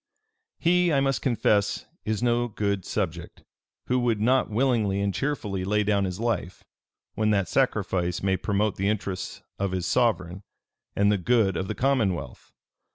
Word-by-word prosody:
"He, 175 0 +3
I 140 - +3
must 135 -1 0
confess, 110 -4 +1 0.2
is 110 +1 -1
no 120 0 +2
good 100 -3 -2
subject, 85 -5 -4 0.4
who 125 0 +1
would 120 -3 +1
not 125 +4 +2
willingly 110 -4 +1
and 100 -1 0
cheerfully 110 -10 -2
lay 105 +2 +1
down 100 -1 +1
his 90 +1 -4
life, 115 -6 -2 0.5
when 110 0 0
that 100 -3 +2
sacrifice 95 -9 0
may 95 -1 +2
promote 105 +1 0
the 95 +1 +1
interests 100 -3 -4 0.2
of 100 -1 -1
his 90 -1 -2
sovereign, 95 -6 +1 0.5
and 100 +1 +3
the 105 - +1
good 105 -1 +2
of 95 +3 -2
the 110 - -3
commonwealth. 110 - -1
105 Hz, 160 wpm, -26 LUFS, 95-120 Hz, 0.5 s, He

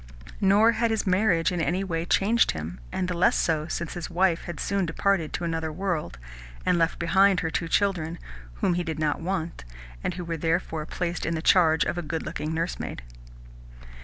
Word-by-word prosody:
Nor 205 +3 +5
had 230 +1 +1
his 220 -1 0
marriage 185 -3 +2
in 175 -2 -1
any 175 +6 0
way 165 -3 -2
changed 220 +6 +3
him, 80 +1 -6
and 180 - -1
the 180 - -1
less 170 - +3
so 155 -2 0
since 170 0 -4
his 175 -2 -5
wife 175 -1 +1
had 175 -4 -6
soon 195 -2 0
departed 170 -1 0
to - - -3
another 165 -1 -2
world, 170 - -3 0.5
and 175 - +3
left 165 0 +1
behind 190 +2 +3
her 160 - -2
two 165 - -1
children, 170 -3 0 0.5
whom 180 - +3
he 175 0 -1
did 160 -3 -4
not 155 -1 0
want, 170 - -3 0.4
and 175 - -2
who 180 -1 -5
were 165 -1 -3
therefore 160 -1 -1
placed 175 -1 -3
in 165 - -1
the 160 - -2
charge 160 -4 +5
of 175 - -2
a - - -2
good 160 0 -4
looking 155 - -4
nursemaid. 165 - -3
170 Hz, 195 wpm, -26 LUFS, 160-190 Hz, 0.5 s, Nor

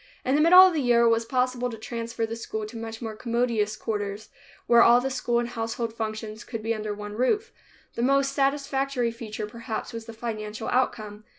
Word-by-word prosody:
In 260 - +1
the 295 - +4
middle 355 +4 +9
of 370 - +3
the 310 - 0
year 240 -2 +4
it 235 - +5
was 230 0 +2
possible 250 0 0
to 225 - -7
transfer 230 +1 -4
the 225 +1 -5
school 220 -1 -5
to 215 +3 -10
much 225 +1 -6
more 220 -1 -5
commodious 230 -2 0
quarters, 205 -1 -4 0.4
where 235 0 +6
all 240 +1 +7
school 245 -2 0
and 240 0 0
household 230 0 -3
functions 220 0 -5
could 225 -3 -6
be 225 +1 0
under 215 -1 -4
one 205 0 -7
roof. 410 - 0 0.4
The - - -3
most 275 +2 +3
satisfactory 275 -3 0
feature, 220 -2 -6
perhaps, 230 +2 -6
was 230 0 -7
the 230 - -8
financial 220 -1 -5
outcome. 215 -4 -1
230 Hz, 200 wpm, -26 LUFS, 220-250 Hz, 0.4 s, middle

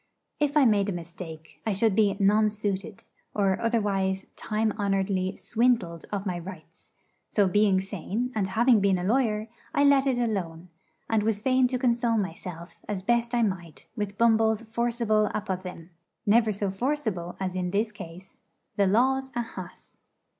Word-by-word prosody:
If 295 0 +1
I 285 - +6
made 205 -3 +3
a - - -1
mistake, 165 -2 -9
I 220 - 0
should 205 +1 +2
be 205 -2 +3
'nonsuited,' 205 0 0 0.3
or 195 -2 +1
otherwise 195 -4 0
time 215 0 -1
honouredly 195 -2 -1
swindled 225 -9 0
of 200 -1 -3
my 180 -3 -2
rights: 170 -2 -11 0.4
so 205 -2 +3
being 200 0 +3
sane 200 +5 -3
and 210 -4 0
having 230 +4 +4
been 195 -1 +3
a 180 - -3
lawyer, 215 0 +1 0.3
I 285 - +4
let 280 -1 +5
it 260 -2 +2
alone; 180 -7 -2 0.4
and 225 -1 +2
was 215 -1 0
fain 255 +2 +3
to 255 0 -1
console 235 -2 +1
myself 175 -2 -5
as 195 -3 -3
best 235 +2 +1
I 235 - +3
might 175 -6 -4
with 205 -2 -4
Bumble's 225 -1 +3
forcible 230 -2 +1
apothegm 185 -4 -5 0.4
never 220 +1 +4
so 200 -1 -2
forcible 215 -6 -2
as 185 -1 -3
in 180 -1 -1
this 210 +4 0
case 185 -2 -10 0.4
'The 200 -1 +4
law's 265 +6 +2
a 240 - 0
hass.' 185 -5 -11
210 Hz, 160 wpm, -27 LUFS, 190-230 Hz, 0.4 s, I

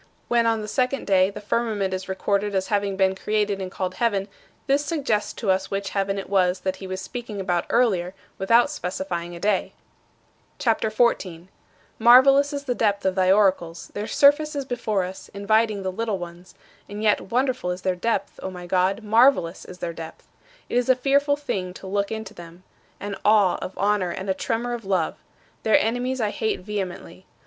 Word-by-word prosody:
When, 235 -1 +3
on 225 -1 +1
the - - -6
second 255 +4 -1
day, 190 -1 +4
the 205 - -8
firmament 210 -2 -1
is 185 +1 -5
recorded 200 +2 -1
as 190 0 -1
having 200 -2 0
been 190 -1 +3
created 205 0 -1
and 185 - -4
called 185 -1 -3
heaven, 200 -1 0 0.4
this 280 +1 +2
suggests 280 -9 -1
to 205 -5 0
us 190 +1 0
which 195 0 -3
heaven 195 0 -1
it 195 - -5
was 185 -2 +2
that 190 0 -2
he 190 - -8
was 185 0 -4
speaking 230 -2 -6
about 180 -3 -1
earlier, 195 -7 +1 0.2
without 230 +8 +4
specifying 175 - -4
a - - -8
day. 200 0 0 0.8
CHAPTER 225 -4 +1
XIV 215 - -16 0.2
17. 175 -1 -10 0.5
Marvelous 270 +5 +6
is 285 -1 -4
the 255 -3 -1
depth 205 -4 0
of 190 - +2
thy 185 0 +3
oracles. 185 -4 +1
Their 210 +1 -4
surface 290 +2 +4
is 280 -1 -2
before 220 -6 -1
us, 185 +1 -8
inviting 215 0 +1
the 190 - -2
little 220 +1 -2
ones; 175 0 -10 0.3
and 205 +1 -6
yet 210 -3 +1
wonderful 255 -4 0
is 180 +1 -4
their 185 -1 +1
depth, 200 +1 -2
O - - -4
my 180 -1 -9
God, 185 +4 +1
marvelous 220 -5 +3
is 180 - -11
their 175 -2 -4
depth! 165 -1 -10 0.4
It - - -1
is 245 - -2
a 260 - +6
fearful 280 +2 +2
thing 190 -11 -4
to - - -11
look 200 +2 -1
into 220 -2 -5
them: 175 0 -12 0.4
an 200 -1 -5
awe 205 -3 +4
of 185 - -6
honor 200 -2 +1
and 190 +2 -3
a - - +2
tremor 235 +5 -2
of 235 -1 -5
love. 185 -4 0 0.4
Their 220 - +4
enemies 245 +3 -1
I 215 -3 0
hate 220 -4 -2
vehemently. 185 -2 -6
200 Hz, 195 wpm, -24 LUFS, 185-230 Hz, 0.8 s, Marvelous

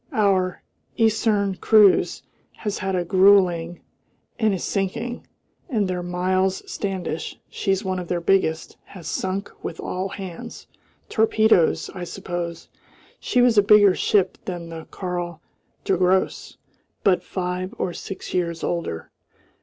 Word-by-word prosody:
Our 190 -4 +1 0.3
Eiserne 215 -3 +2
Kreuz 210 -3 +4 0.3
has 210 -2 -4
had 190 -1 -1
a 175 -1 0
gruelling 180 -2 +4 0.6
and 220 -2 +3
is 190 -3 -2
sinking, 225 +5 -3 0.4
and 215 -6 +1
their 180 -1 -2
Miles 185 +2 0
Standish 190 -5 -4
she's 195 0 -1
one 185 -1 -1
of 180 - -6
their 175 0 -1
biggest 170 -3 +1
has 175 -5 -11
sunk 190 +3 -3
with 165 - -5
all 185 +2 -3
hands. 190 -3 -8 0.4
Torpedoes, 220 -5 +3
I 180 -2 -5
suppose. 175 -2 -5 0.5
She 245 - +2
was 235 -4 +5
a - - +7
bigger 205 -1 +6
ship 190 0 +1
than 175 -3 -5
the 165 -1 -8
Karl 175 -3 -4 0.4
der 190 - +1
Grosse, 185 +1 +1 0.5
but 190 -3 +3
five 180 0 -4
or 175 - -2
six 195 - -7
years 170 -2 -1
older. 170 - -3
185 Hz, 130 wpm, -23 LUFS, 175-200 Hz, 0.6 s, a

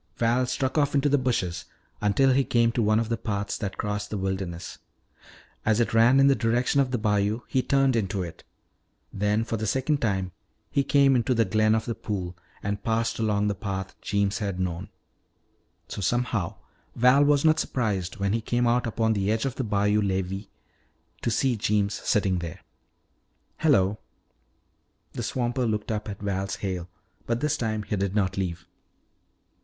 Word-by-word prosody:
Val 120 +2 +2
struck 130 +4 0
off 145 0 +1
into 140 +1 +3
the 145 0 +3
bushes 95 -9 -1 0.4
until 105 +6 +3
he 135 +1 +3
came 115 -2 +2
to 120 - 0
one 110 0 +3
of 115 - -1
the 115 0 -1
paths 100 -3 -3
that 100 -3 -4
crossed 105 0 -3
the 105 - -3
wilderness. 95 -3 -4 0.8
As 110 +1 +2
it 120 - +1
ran 115 +4 +5
in 135 - +6
the 140 - +6
direction 120 +3 +2
of 135 - 0
the 125 - 0
bayou, 105 +1 +1
he 130 - +1
turned 135 -1 +2
into 100 -3 -1
it. 85 - -9 0.7
Then 105 +2 +1
for 115 0 -3
the 110 +1 -3
second 135 +5 0
time 95 -5 0 0.4
he 140 - +2
came 140 -1 +4
into 125 +1 +1
the 115 -1 +3
glen 110 +2 +3
of 110 - -1
the 115 - -2
pool 95 -5 -4 0.3
and 100 0 -3
passed 115 0 0
along 105 -2 +1
the 100 - +1
path 95 -2 -5
Jeems 100 -1 0
had 100 -4 -3
known. 90 -1 -3 1.0
So - - -6
somehow 105 -2 0 0.4
Val 125 +4 +5
was 145 0 +3
not 155 0 +5
surprised, 100 -8 -1
when 100 0 0
he 115 - 0
came 120 +2 0
out 120 0 +2
upon 110 -1 +1
the 100 0 0
edge 110 +4 0
of 135 - -1
the 130 - -3
bayou 105 -1 +2
levee, 95 0 -2 0.7
to - - 0
see 120 +2 +1
Jeems 105 -1 +1
sitting 95 -3 +1
there. 85 -2 -7 1.0
"Hello!" 105 - +3 1.1
The - - -4
swamper 120 +2 -1
looked 105 0 -2
up 105 0 -3
at 100 - -6
Val's 95 -1 -2
hail 90 -3 -4 0.4
but 115 0 0
this 150 +2 +1
time 110 -4 -2
he 105 - -2
did 100 0 -1
not 95 -2 +1
leave. 90 -2 -3
110 Hz, 180 wpm, -26 LUFS, 100-120 Hz, 1.1 s, in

